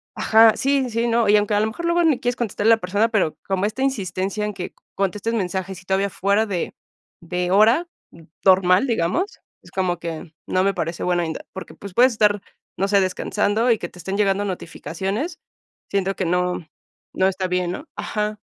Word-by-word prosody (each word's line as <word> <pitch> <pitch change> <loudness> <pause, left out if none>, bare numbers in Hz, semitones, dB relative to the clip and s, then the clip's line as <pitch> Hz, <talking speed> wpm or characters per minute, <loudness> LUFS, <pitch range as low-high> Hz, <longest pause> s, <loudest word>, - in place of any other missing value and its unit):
ajá, 220 0 +5
sí, 275 -1 +1
sí, 230 +1 0
no, 230 -2 +2
y 210 - +7
aunque 205 0 0
a - - +3
lo 215 - +2
mejor 335 +10 -5
luego 340 0 +2
ni 310 -6 +3
quieres 245 0 -1
contestarle 225 -1 +2
a - - +7
la - - -22
persona, 205 +5 +1
pero 200 -9 0
como 195 0 0
esta 215 +5 -3
insistencia 200 -5 -1
en 210 - -3
que 180 -1 -6 0.2
contestes 200 +4 -1
mensajes 190 -2 -3
y - - -22
todavía 195 +1 +1
fuera 200 +3 +1
de 190 -5 -3 0.5
de 180 +1 -2
hora 225 - +4 0.6
normal, 185 +3 +5
digamos, 235 - -1 0.2
es - - -17
como 185 -2 0
que 165 -1 -6
no 185 - +1
me 195 - +2
parece 170 -1 -3
bueno, 175 -1 +1 0.3
porque, 190 - -8
pues, 200 -2 -10
puedes 250 +4 +5
estar, 210 -2 +2 0.4
no 195 - +1
sé, 200 -1 +4
descansando 205 +5 +1
y 225 - +3
que 175 - -4
te - - -17
estén 190 +4 -3
llegando 200 -1 +2
notificaciones, 190 - -4 0.5
siento 195 -1 0
que 190 - -1
no 180 -1 -1 0.5
no 190 - +2
está 190 -1 -1
bien, 180 -1 0
¿no? 290 - -7
Ajá. 210 0 -3
200 Hz, 195 wpm, -22 LUFS, 185-225 Hz, 0.6 s, y